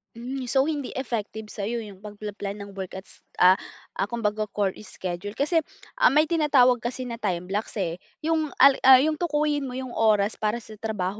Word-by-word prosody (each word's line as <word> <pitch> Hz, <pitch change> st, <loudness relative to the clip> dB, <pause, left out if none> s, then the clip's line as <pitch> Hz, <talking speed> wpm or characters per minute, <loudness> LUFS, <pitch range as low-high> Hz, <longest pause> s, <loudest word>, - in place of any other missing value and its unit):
Hmm. 250 Hz, +2 st, -5 dB
So 265 Hz, +2 st, +3 dB
hindi 290 Hz, -3 st, -3 dB
effective 220 Hz, -4 st, -4 dB
sa 200 Hz, -2 st, -4 dB
'yo 235 Hz, 0 st, -2 dB
'yong 200 Hz, -3 st, -11 dB
pagpa-plan 205 Hz, -1 st, -6 dB
ng 200 Hz, -, -10 dB
work 190 Hz, -2 st, -7 dB
at 190 Hz, -, -7 dB
s -, -, -21 dB, 0.2 s
ah, 185 Hz, +1 st, +6 dB, 0.5 s
kumbaga 215 Hz, -2 st, -1 dB
chore 200 Hz, -1 st, 0 dB
schedule 195 Hz, 0 st, -6 dB
kasi, 315 Hz, +4 st, +2 dB, 0.4 s
ah, -, -, +7 dB
may 300 Hz, +2 st, +5 dB
tinatawag 290 Hz, -7 st, +4 dB
kasi 240 Hz, +3 st, -4 dB
na 235 Hz, -2 st, -6 dB
time 180 Hz, -5 st, -1 dB
blocks, 210 Hz, +2 st, -3 dB
eh. 180 Hz, -4 st, -2 dB, 0.2 s
'Yong 320 Hz, -1 st, +1 dB
al 275 Hz, +1 st, +6 dB
ah, 265 Hz, -, +11 dB
'yong 305 Hz, +4 st, +2 dB
tukuyin 295 Hz, -4 st, 0 dB
mo 250 Hz, -, -6 dB
'yong 260 Hz, -1 st, -5 dB
oras 215 Hz, -2 st, +2 dB
para 215 Hz, +2 st, -1 dB
sa -, -, -14 dB
trabaho 210 Hz, -3 st, -3 dB
225 Hz, 195 wpm, -25 LUFS, 205-270 Hz, 0.5 s, ah